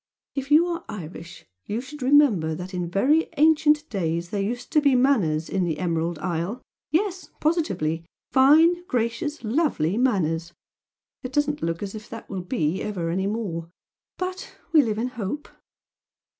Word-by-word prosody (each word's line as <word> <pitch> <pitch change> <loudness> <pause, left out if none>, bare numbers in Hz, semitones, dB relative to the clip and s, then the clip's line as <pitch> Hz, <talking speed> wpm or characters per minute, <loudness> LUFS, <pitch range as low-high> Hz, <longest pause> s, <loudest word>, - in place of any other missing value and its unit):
If 275 0 -4
you 310 +3 +6
are 340 -1 -3
Irish 180 -3 -8 0.2
you 215 - -2
should 275 +3 -9
remember 250 - +4
that 180 +3 -7
in 175 -2 -2
very 280 - +2
ancient 305 0 +4
days 170 -3 -2
there 205 - -1
used 240 +5 -4
to 305 - +4
be 280 -3 +4
manners 200 - +2
in 190 -1 0
the 165 -3 -1
Emerald 170 -1 -1
Isle. 175 +7 -2 0.3
Yes, 370 +4 -1
positively! 300 - 0 0.3
Fine, 320 +6 +5
gracious, 240 +5 -2
lovely 225 - +1
manners! 170 -9 0 0.7
It 255 - -6
doesn't 295 +1 0
look 165 +3 -2
as 195 - -5
if 215 -1 -9
that 225 -1 -8
will 190 -2 -3
be 180 - -1
ever 175 -6 -2
any 190 +3 0
more 190 -7 -3 0.5
but 370 +1 -5 0.2
we 310 - +8
live 220 -5 -1
in 240 +3 -1
hope. 245 +5 -5
225 Hz, 155 wpm, -24 LUFS, -, 0.7 s, we